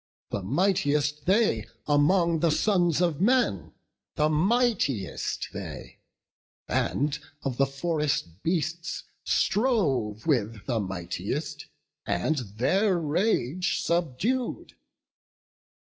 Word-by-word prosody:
The 100 - -2
mightiest 145 - +1
they 190 - +2 0.2
among 165 +3 +3
the 170 - +3
sons 175 -1 +2
of 170 -3 +1
men; 200 - +2 0.4
The 150 0 +2
mightiest 185 - 0
they, - - -8 0.7
and 145 +1 0 0.2
of 130 -3 -2
the 135 - +3
forest 140 - -2
beasts 170 +1 -2 0.2
Strove 140 - +1
with 115 -8 0
the 120 -4 0
mightiest, 95 -4 -4 0.4
and 120 - +1
their 135 - +1
rage 170 - 0
subdued. 175 - -1
150 Hz, 90 wpm, -27 LUFS, 125-185 Hz, 0.7 s, among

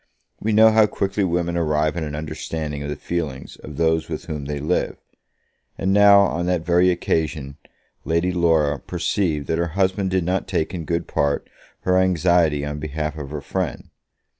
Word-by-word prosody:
We 110 - -1
know 110 +1 +6
how 110 -1 +5
quickly 100 0 -1
women 85 -1 0
arrive 75 -2 +1
at 85 - -3
an 75 -2 -4
understanding 75 -1 -4
of 70 - -4
the 75 - -3
feelings 75 -4 -5
of 75 -2 -10
those 80 -1 +1
with - - -5
whom 75 -4 -5
they 75 0 -3
live; 80 +5 -1 0.8
and 95 +1 0
now, 100 0 +7
on 85 -3 0
that 90 -2 0
very 90 +1 +4
occasion, 80 -5 -1 0.5
Lady 85 +3 +1
Laura 80 -5 +2
perceived 80 -8 -1
that 80 +3 -1
her 85 - +1
husband 95 0 +1
did 95 -1 +1
not 90 +3 -1
take 90 -3 -1
in 85 -3 -4
good 85 +2 -1
part 70 0 0 0.3
her 90 0 +2
anxiety 85 -5 +2
on 75 0 -4
behalf 75 0 -3
of 75 -3 -7
her 75 0 -5
friend. 90 -2 -4
85 Hz, 180 wpm, -22 LUFS, 75-90 Hz, 0.8 s, now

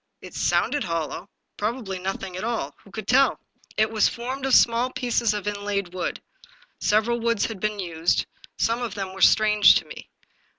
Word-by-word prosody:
It - - -12
sounded 290 -1 +1
hollow; 165 +2 -4 0.3
probably 210 -3 -3
nothing 190 0 -4
at 185 - -5
all 225 -12 -2
— - - -25
^who 200 - -18
could 215 -1 -7
tell? 270 +2 +4 0.4
It 215 +1 +2
was 215 -2 +3
formed 260 +3 -4
of 265 - +5
small 235 +2 +4
pieces 240 -3 0
of 210 0 -5
inlaid 200 -3 -3
wood. 185 - -3 0.6
Several 220 +3 +1
woods 230 -3 +1
had 220 -4 -5
been 215 +1 -1
used; 170 -3 0 0.3
some 230 +2 0
of 230 -4 -4
them 195 -2 -5
were 195 - -9
strange 210 0 +6
to - - 0
me. - - -11
210 Hz, 180 wpm, -24 LUFS, 190-235 Hz, 0.6 s, strange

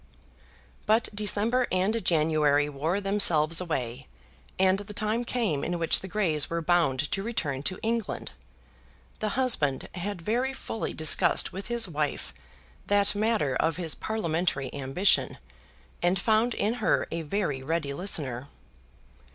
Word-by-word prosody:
But 220 +2 +3
December 215 +4 +1
and 195 +4 0
January 155 -3 +2
wore 155 +7 -1
themselves 175 -5 +3
away, 125 - -4 0.5
and 190 +1 +3
the 205 0 -9
time 215 +3 0
came 225 - -1
in 175 0 -2
which 165 -1 +3
the 190 - -8
Greys 175 -7 0
were 170 - -1
bound 155 -5 +1
to 195 - -1
return 160 - -3
to 185 +6 -2
England. 230 -1 -2 0.9
The 215 +2 -2
husband 190 - +1
had 195 +1 -4
very 240 +9 -1
fully 225 - -5
discussed 155 0 +3
with 195 +1 -6
his 235 -2 0
wife 150 - -3 0.5
that 205 0 +4
matter 205 - 0
of 160 +3 0
his 165 -4 -1
parliamentary 170 -10 -2
ambition, 140 +8 +1 0.6
and 175 +2 +2
found 220 +4 +2
in 215 +3 0
her 205 - +2
a 165 - -2
very 155 -4 -2
ready 150 0 -2
listener. 140 -7 -2
180 Hz, 135 wpm, -27 LUFS, 150-210 Hz, 0.9 s, that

